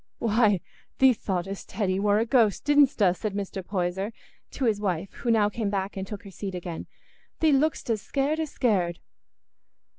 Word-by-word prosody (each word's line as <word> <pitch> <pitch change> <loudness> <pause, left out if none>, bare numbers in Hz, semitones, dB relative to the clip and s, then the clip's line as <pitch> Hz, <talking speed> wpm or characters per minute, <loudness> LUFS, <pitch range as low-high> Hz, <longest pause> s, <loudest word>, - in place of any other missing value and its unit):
"Why, 215 -4 +3 0.4
thee 265 -1 +6
thought'st 195 -2 -4
Hetty 190 -3 0
war 205 0 +3
a 225 - +2
ghost, 230 -4 +2
didstna?" 270 -11 +4
said 210 0 -4
Mr. 195 -1 -4
Poyser 190 +2 -2 0.4
to 265 - -3
his 210 -3 +1
wife, 185 -2 -2
who 240 - -4
now 220 -3 +4
came 210 0 -2
back 195 0 -2
and 190 0 -4
took 210 +2 -7
her 200 - -11
seat 190 0 -5
again. 175 -2 -6 0.5
"Thee 320 -1 +4
look'dst 295 +2 +1
as 215 -2 0
scared 285 +6 -1
as 315 -2 -2
scared." 185 -11 +1
205 Hz, 175 wpm, -26 LUFS, 190-235 Hz, 0.5 s, thee